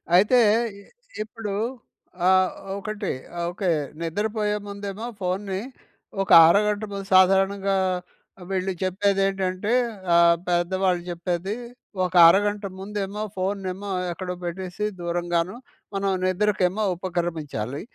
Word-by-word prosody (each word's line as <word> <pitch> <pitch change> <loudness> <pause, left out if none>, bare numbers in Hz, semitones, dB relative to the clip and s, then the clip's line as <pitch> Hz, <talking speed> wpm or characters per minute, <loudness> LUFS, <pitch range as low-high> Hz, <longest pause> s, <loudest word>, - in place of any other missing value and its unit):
అయితే 210 +7 +5 0.4
ఇ 200 - -15 0.4
ఇప్పుడు 215 -1 -6 0.7
ఆ - - +6 0.5
ఒకటి. 210 0 -4 0.4
ఓకే. 185 0 -2 0.3
నిద్రపోయే 210 +5 -1
ముందుఏమో 200 +2 -6 0.2
ఫోన్‌ని, 190 +1 -2 0.6
ఒక 195 - -3 0.2
అరగంట 210 +3 +3
ముందు 200 -1 -5
సాధారణంగా 195 +1 +4 0.7
వీళ్ళు 190 0 -1
చెప్పేది 195 +1 +1
ఏంటంటే, 195 +3 -1 0.4
ఆహ్, 170 0 +6
పెద్దవాళ్ళు 180 +1 +1
చెప్పేది. 175 +3 -3 0.5
ఒక 180 - -5
అరగంట 205 +3 +3
ముందుఏమో, 205 +1 -4
ఫోన్‌ను 195 +1 -2
ఏమో, 200 +2 -8 0.2
ఎక్కడో 180 +1 -5
పెట్టేసి 185 +3 -4 0.2
దూరంగాను 175 +2 -1 0.4
మనం 195 0 0 0.2
నిద్రకేమో 190 +1 +1
ఉపక్రమించాలి. 160 - -3
190 Hz, 100 wpm, -24 LUFS, 180-205 Hz, 0.7 s, ఆ